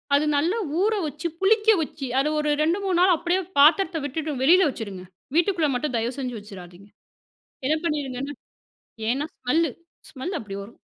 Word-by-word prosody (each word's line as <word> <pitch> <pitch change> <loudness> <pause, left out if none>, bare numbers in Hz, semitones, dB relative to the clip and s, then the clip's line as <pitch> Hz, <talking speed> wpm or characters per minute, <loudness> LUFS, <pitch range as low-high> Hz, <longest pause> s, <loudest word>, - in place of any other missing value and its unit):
அது 290 +2 +3
நல்லா 340 +9 +1 0.2
ஊற 430 +3 +3
வச்சு, 300 +3 -4
புளிக்க 425 +3 +3
வச்சு 285 -2 -5
அதை 285 +3 +1
ஒரு 300 0 0
2, 330 +4 +2
3 370 -3 +1
நாள் 365 -1 +5
அப்படியே 345 +3 0 0.2
பாத்திரத்தை 325 +4 +5
விட்டுட்டு 300 +2 -3
வெளியில 355 +5 +6
வச்சுருங்க. 200 -8 -7 0.3
வீட்டுக்குள்ள 340 -3 +2
மட்டும் 260 0 -2
தயவு 230 +3 -1
செஞ்சு 250 -3 -4
வச்சுராதீங்க. 195 -2 -12 0.8
என்ன 310 +3 +2
பண்ணீருங்கன்னா, 285 -3 -3 0.7
ஏன்னா 270 +5 0
ஸ்மெல்லு, 315 +5 +1 0.4
ஸ்மெல் 315 +6 -5
அப்படி 195 -3 -7
வரும். 205 +4 -13
300 Hz, 155 wpm, -24 LUFS, 250-340 Hz, 0.8 s, வெளியில